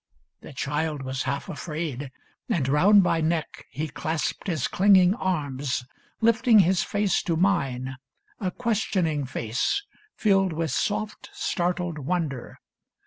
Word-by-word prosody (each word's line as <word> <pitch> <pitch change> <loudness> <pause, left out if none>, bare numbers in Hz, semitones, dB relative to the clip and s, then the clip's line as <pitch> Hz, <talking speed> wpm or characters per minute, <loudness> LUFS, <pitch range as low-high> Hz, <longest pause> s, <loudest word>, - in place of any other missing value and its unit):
The - - -11
child 150 +1 -2
was 130 0 -3
half 140 +1 -3
afraid; 150 -4 -4 0.4
And 140 -7 +1
round 190 +9 +6
my 170 -2 +1
neck 160 0 -2
he 150 +4 -3
clasped 155 +5 -3
his 160 -8 0
clinging 190 -1 +5
arms, 145 - -2 0.4
Lifting 230 0 +5
his 185 0 +2
face 205 -2 +1
to 170 - -1
mine, 135 -8 0 0.4
a 190 - -1
questioning 185 - 0
face. 125 - -1 0.3
Filled 195 -4 +2
with 160 0 -2
soft, 215 +1 -2
startled 175 -2 -1
wonder. 150 -4 -3
165 Hz, 125 wpm, -26 LUFS, 140-190 Hz, 0.4 s, round